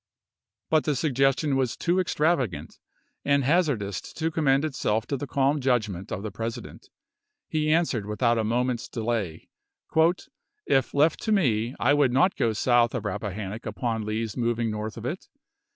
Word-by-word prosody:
But 155 -1 +3
the 150 - +1
suggestion 135 0 +1
was 130 -3 0
too 175 +2 +1
extravagant 150 - 0 0.4
and 140 0 +2
haz 165 +5 +3
ardous 100 -8 -3
to 160 0 -1
commend 145 -2 +2
itself 115 -6 -1
to 140 - -2
the 140 +2 -5
calm 140 +2 +1
judgment 110 -8 -1
of 95 - -4
the 110 - -4
President. 115 +3 -6 0.6
He 155 -1 0
answered 155 -11 +1
without 115 +2 +1
a - - +1
moment's 120 +2 -1
delay, 110 -8 -3 1.2
"If 135 0 +1
left 150 +2 +3
to 220 - -2
me, 125 - +1
I 135 +4 +3
would 145 -3 +3
not 180 +9 +3
go 115 - +1
south 120 +1 +2
of - - -3
Rappahannock 105 +1 -4
upon 115 -3 -2
Lee's 110 0 -3
moving 120 -2 0
north 105 +1 -5
of - - -7
it. - - -4
125 Hz, 160 wpm, -26 LUFS, 110-145 Hz, 1.2 s, But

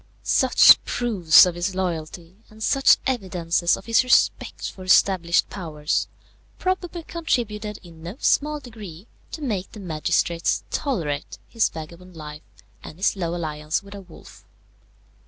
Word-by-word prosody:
Such - - +6
proofs 195 -11 +4
of 180 - -2
his 175 +3 -3
loyalty, 170 -1 -4
and 220 0 -10
such 270 +3 +4
evidences 180 -8 0
of 195 - -13
his 230 +2 +3
respect 250 - +1
for 185 - -12
established 185 -2 +3
powers, 155 -5 -2 0.5
probably 365 -2 -3
contributed 220 -11 -3
in 165 -2 -15
no 175 +5 -7
small 300 +1 +1
degree 210 - -11 0.3
to 310 - -7
make 205 -8 -3
the 215 - -11
magistrates 170 -1 -1
tolerate 160 - -3
his 230 -2 +1
vagabond 170 +3 -11
life 150 -1 -9 0.4
and 155 - -11
his 190 - +1
low 175 -3 -3
alliance 155 -1 -3
with 200 0 -12
a 200 - -9
wolf. 180 -4 -16
185 Hz, 135 wpm, -23 LUFS, 165-220 Hz, 0.5 s, Such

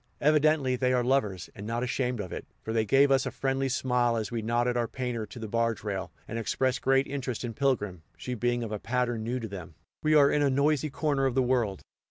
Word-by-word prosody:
Evidently 150 -3 +3
they 125 0 +1
are 125 -1 +2
lovers, 105 -9 0
and 100 +1 -8
not 120 +2 -1
ashamed 125 -1 -1
of 95 -4 -5
it, - - -6 0.2
for 110 - -3
they 110 -1 +2
gave 135 +5 +4
us 135 -1 +3
a - - 0
friendly 135 0 -1
smile 125 -2 +1
as 110 0 -3
we 115 -1 -2
knotted 120 +2 +1
our 120 -1 +1
painter 125 -4 -3
to 105 - -11
the 110 -2 -5
barge 115 -1 0
rail, 100 -3 -3 0.2
and 115 - -4
expressed 130 +3 0
great 135 +1 +3
interest 130 -4 -4
in 120 -2 -4
Pilgrim, 105 - 0 0.2
she 125 - -5
being 120 +1 0
of 110 - -5
a 105 - -3
pattern 120 -1 -1
new 125 +3 -2
to 115 - -5
them. 90 -5 -9 0.3
We 155 0 +3
are 140 -2 +6
in 150 - +2
a 145 - +3
noisy 145 +2 +2
corner 140 -1 0
of 125 - -2
the 130 - +3
world. 120 -6 0
125 Hz, 240 wpm, -28 LUFS, 115-135 Hz, 0.3 s, are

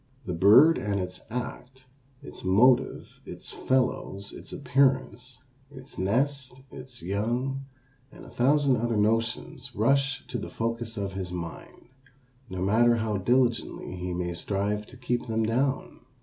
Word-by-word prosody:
The 90 - -3
bird 110 - +7
and 100 -1 -1
its 90 0 -5
act, 125 +2 -6 0.4
its - - -10
motive, 125 +7 +3
its - - -10
fellows, 125 -6 -1
its - - -10
appearance, 130 -2 0 0.3
its 130 -1 -10
nest, 130 +6 0
its 130 -2 -10
young, 120 +8 -2 0.5
and - - -13
a - - -13
thousand 140 +1 +3
other 115 0 0
notions 115 +6 -1
rush 135 +4 +1
to 120 - -3
the - - -6
focus 115 0 -3
of 100 -1 -3
his 95 -2 -4
mind, 85 +6 -8 0.6
no 95 0 -3
matter 115 +4 +4
how 110 -2 -1
diligently 120 -2 0
he 90 0 -4
may 90 0 -2
strive 100 +4 -2
to 130 - -14
keep 125 -1 -2
them 110 0 0
down. 130 +5 -1
120 Hz, 140 wpm, -27 LUFS, 100-130 Hz, 0.6 s, bird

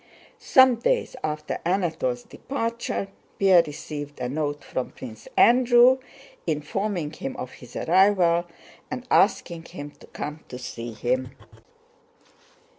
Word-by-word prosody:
Some 260 -4 +5
days 475 - 0
after 150 0 -3
Anatole's 165 -9 0
departure 230 -6 -3 0.3
Pierre 190 -3 +6
received 145 0 -7
a 125 - -2
note 145 +2 -2
from 130 - -3
Prince 110 -4 -10
Andrew, 245 +1 +6 0.5
informing 160 +2 -2
him 135 - -5
of 125 - -6
his 125 -2 -14
arrival 175 -1 +3 0.4
and 255 -1 -5
asking 170 -4 +2
him 145 -4 -8
to - - -15
come 150 +1 -6
to 125 - -7
see 120 -2 -6
him. 125 +3 -1
165 Hz, 115 wpm, -25 LUFS, 140-205 Hz, 0.5 s, Pierre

